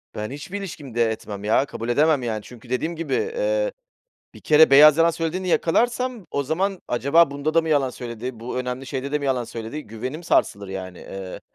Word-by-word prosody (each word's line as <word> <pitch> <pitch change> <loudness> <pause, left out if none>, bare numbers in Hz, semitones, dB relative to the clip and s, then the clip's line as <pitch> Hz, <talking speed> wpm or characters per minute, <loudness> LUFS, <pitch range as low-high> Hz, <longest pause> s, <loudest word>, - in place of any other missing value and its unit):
Ben 105 +3 -4
hiçbir 145 +8 -6
ilişkimde 130 - -2
etmem 105 -2 -6
ya, 110 +6 +3
kabul 115 -4 -6
edemem, 145 +2 +3
yani. 110 -3 -2
Çünkü 120 +1 -14
dediğim 155 +7 -1
gibi, 165 +1 -4
eee, - - 0 0.6
1 - - -13
kere 155 0 +6
beyaz 150 +2 +8
yalan 165 +1 +5
söylediğini 165 +3 -3
yakalarsam 235 +5 +1
o 140 - -1
zaman 185 +7 -1
"Acaba 140 +6 +4
bunda 145 +2 -2
da 165 - +6
mı 160 - -4
yalan 140 -4 +2
söyledi? 120 -1 -7
Bu 125 +2 -4
önemli 125 +1 -4
şeyde 135 +1 -4
de 150 - +2
mi 140 - -4
yalan 130 -3 0
söyledi?" 115 +6 -6
Güvenim 130 +9 -6
sarsılır, 100 - +1
yani, 95 -2 -6
eee, 95 -1 -8
140 Hz, 190 wpm, -23 LUFS, 120-165 Hz, 0.6 s, beyaz